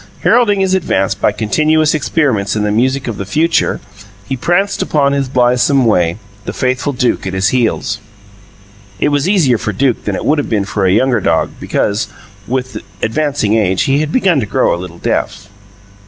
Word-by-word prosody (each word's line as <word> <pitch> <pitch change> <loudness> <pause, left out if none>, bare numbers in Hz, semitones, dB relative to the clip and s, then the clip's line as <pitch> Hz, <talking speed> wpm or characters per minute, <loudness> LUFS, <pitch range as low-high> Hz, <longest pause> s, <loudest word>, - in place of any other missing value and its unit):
Heralding 205 -5 +3
his 190 -1 +1
advance 100 - +1
by 100 - 0
continuous 155 +8 +1
experiments 130 -10 0
in 105 - 0
the 105 - 0
music 130 +5 0
of 115 - -4
the - - -4
future, 160 - +1 0.5
he 135 - -2
pranced 195 +9 0
upon 140 -2 +1
his 140 -2 -1
blithesome 125 +1 +2
way, 90 -5 +2 0.3
the - - -4
faithful 130 +2 -1
Duke 125 -6 -1
at 95 - -4
his 95 +2 +2
heels. 120 -2 0 1.0
(It - - +2
was 145 +4 0
easier 145 - +3
for 110 - -3
Duke 125 +4 0
than 105 - -1
it - - -5
would 150 +1 +2
have 145 - -3
been 105 -3 0
for 100 -1 -1
a - - +3
younger 120 +2 +2
dog, 80 -2 +1
because, 100 +1 -1 0.4
with 130 +1 -3 0.2
advancing 140 -3 0
age, 95 -4 +1
he 135 +1 +1
had 155 0 -2
begun 190 - +2
to 110 - -2
grow - - +1
a 85 - -4
little 90 -2 -9
deaf.) 100 - -2
125 Hz, 185 wpm, -14 LUFS, 105-150 Hz, 1.0 s, Heralding